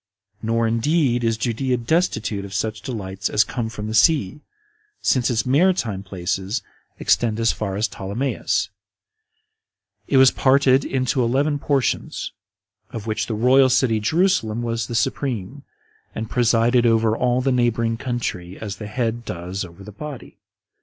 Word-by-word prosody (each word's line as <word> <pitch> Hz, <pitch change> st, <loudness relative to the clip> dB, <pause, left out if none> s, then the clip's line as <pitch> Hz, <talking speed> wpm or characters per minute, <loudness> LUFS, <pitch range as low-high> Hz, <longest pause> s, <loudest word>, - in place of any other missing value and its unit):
Nor 115 Hz, +1 st, +1 dB
indeed 120 Hz, +2 st, +1 dB
is 115 Hz, -1 st, +1 dB
Judea 125 Hz, +2 st, -1 dB
destitute 115 Hz, -, 0 dB
of 100 Hz, 0 st, -8 dB
such 110 Hz, 0 st, -2 dB
delights 100 Hz, -5 st, -4 dB
as 105 Hz, -, +4 dB
come 120 Hz, -3 st, -4 dB
from 105 Hz, -2 st, -6 dB
the 110 Hz, -, -4 dB
sea, 145 Hz, -, +3 dB, 0.6 s
since 125 Hz, -1 st, +2 dB
its 115 Hz, -3 st, 0 dB
maritime 130 Hz, -, +2 dB
places 95 Hz, +3 st, -3 dB, 0.3 s
extend 115 Hz, -2 st, +1 dB
as 115 Hz, 0 st, +3 dB
far 100 Hz, -3 st, -4 dB
as 105 Hz, +3 st, +1 dB
Ptolemais: 100 Hz, -1 st, -2 dB, 1.4 s
it 135 Hz, -, +2 dB
was 130 Hz, -1 st, +7 dB
parted 135 Hz, 0 st, +3 dB
into 130 Hz, -1 st, 0 dB
eleven 140 Hz, +5 st, +1 dB
portions, 140 Hz, -3 st, -1 dB, 0.6 s
of 110 Hz, -2 st, -7 dB
which 110 Hz, -1 st, -2 dB
the 110 Hz, -, -2 dB
royal 130 Hz, +4 st, +5 dB
city 125 Hz, -3 st, +2 dB
Jerusalem 120 Hz, -, +1 dB
was 115 Hz, -2 st, -2 dB
the 120 Hz, -, -5 dB
supreme, 130 Hz, 0 st, -2 dB, 0.5 s
and 110 Hz, 0 st, -5 dB
presided 120 Hz, 0 st, +3 dB
over 115 Hz, -1 st, +3 dB
all 125 Hz, +1 st, +1 dB
the 135 Hz, +1 st, +1 dB
neighboring 115 Hz, -2 st, +1 dB
country, 110 Hz, -8 st, -4 dB
as 100 Hz, -3 st, -6 dB
the 105 Hz, -, -7 dB
head 120 Hz, +1 st, -2 dB
does 90 Hz, 0 st, -5 dB
over 85 Hz, +2 st, -11 dB
the 105 Hz, -, -10 dB
body. 145 Hz, +4 st, -9 dB
115 Hz, 145 wpm, -22 LUFS, 105-130 Hz, 1.4 s, was